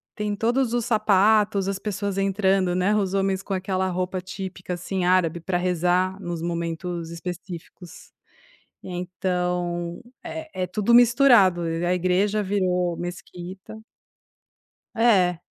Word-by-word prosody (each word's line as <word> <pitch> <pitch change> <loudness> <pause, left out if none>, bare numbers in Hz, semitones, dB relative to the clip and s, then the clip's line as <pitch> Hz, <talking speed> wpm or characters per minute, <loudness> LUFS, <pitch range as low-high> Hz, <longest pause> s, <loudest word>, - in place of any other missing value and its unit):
tem 210 -1 -2
todos 240 +3 +1
os 240 -2 0
sapatos, 210 -2 +3
as 195 - -1
pessoas 200 -1 -3
entrando, 195 -2 +1
né, 185 +3 +2
os 195 -3 0
homens 195 0 0
com 195 - -4
aquela 190 0 -1
roupa 185 +1 -2
típica, 185 -1 -6
assim, 180 +2 -3
árabe 180 -2 +2
para 175 +2 -1
rezar 180 +1 +1
nos 175 -3 -4
momentos 170 0 -3
específicos. 175 0 -9 0.7
Então, 180 -1 -3 0.2
é 160 +4 -6
é - - 0
tudo 215 +4 +1
misturado, 240 -7 +6
a 165 +1 -1
a - - +3
igreja 190 +4 +1
virou 180 -3 0
mesquita. 180 +3 -8 1.2
É. 190 -7 +3
185 Hz, 125 wpm, -24 LUFS, 175-200 Hz, 1.2 s, misturado